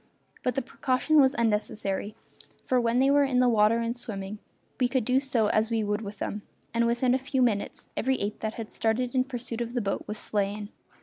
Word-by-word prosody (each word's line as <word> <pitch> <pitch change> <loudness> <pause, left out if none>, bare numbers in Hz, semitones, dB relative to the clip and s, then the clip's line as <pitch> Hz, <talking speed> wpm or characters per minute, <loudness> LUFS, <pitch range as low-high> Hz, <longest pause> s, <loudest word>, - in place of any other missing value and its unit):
But 250 -2 -1
the 270 - 0
precaution 265 +4 +2
was 265 +1 +3
unnecessary, 210 -2 -1 0.5
for 255 -1 +2
when 235 0 +1
they 270 +2 +4
were 285 0 +5
in 265 -2 +1
the 250 - +5
water 220 -1 +4
and 230 0 -1
swimming 210 -4 -5 0.4
we 250 - +3
could 250 -3 0
do 255 +2 +3 0.3
as 215 +1 +2
we 225 -2 0
would 210 +1 -1
with 205 -1 -7
them, 205 +1 -4 0.3
and 235 0 +2
within 240 +2 +2
a 260 - +2
few 265 0 0
minutes 215 -5 -1
every 265 +1 0
ape 205 +1 -3
that 220 0 -3
had 225 -2 -6
started 240 +2 0
in 255 -1 +2
pursuit 245 -3 -5
of 235 +1 -4
the - - +2
boat 200 -2 -2
was 210 - -4
slain. 205 0 -2
235 Hz, 210 wpm, -27 LUFS, 210-255 Hz, 0.5 s, were